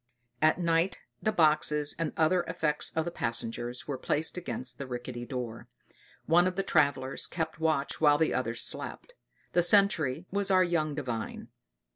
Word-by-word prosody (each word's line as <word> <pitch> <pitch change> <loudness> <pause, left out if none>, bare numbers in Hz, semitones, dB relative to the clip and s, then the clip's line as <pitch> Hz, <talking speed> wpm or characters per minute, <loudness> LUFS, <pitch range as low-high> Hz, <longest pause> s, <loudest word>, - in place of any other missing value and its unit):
At 155 0 +4
night 170 +1 +1 0.2
the 215 - +1
boxes 150 -4 +2
and 165 -2 -1
other 170 +3 +3
effects 155 -3 -1
of 160 -1 0
the 175 - -3
passengers 120 -3 -4
were 140 -3 -3
placed 155 +4 -1
against 130 -8 -4
the 140 - -5
rickety 120 -1 -6
doors. 125 -4 -5 0.6
One 175 +3 +4
of 185 - -2
the 195 - 0
travellers 140 -7 +1
kept 160 -2 -4
watch 155 -3 0
while 145 -2 +6
the 160 +1 +1
others - - -1
slept. - - -3 0.4
The 175 - +4
sentry 175 -5 +3
was 200 0 0
our 185 -1 +5
young 155 -4 0
Divine. 120 -7 -5
155 Hz, 160 wpm, -29 LUFS, 130-175 Hz, 0.6 s, while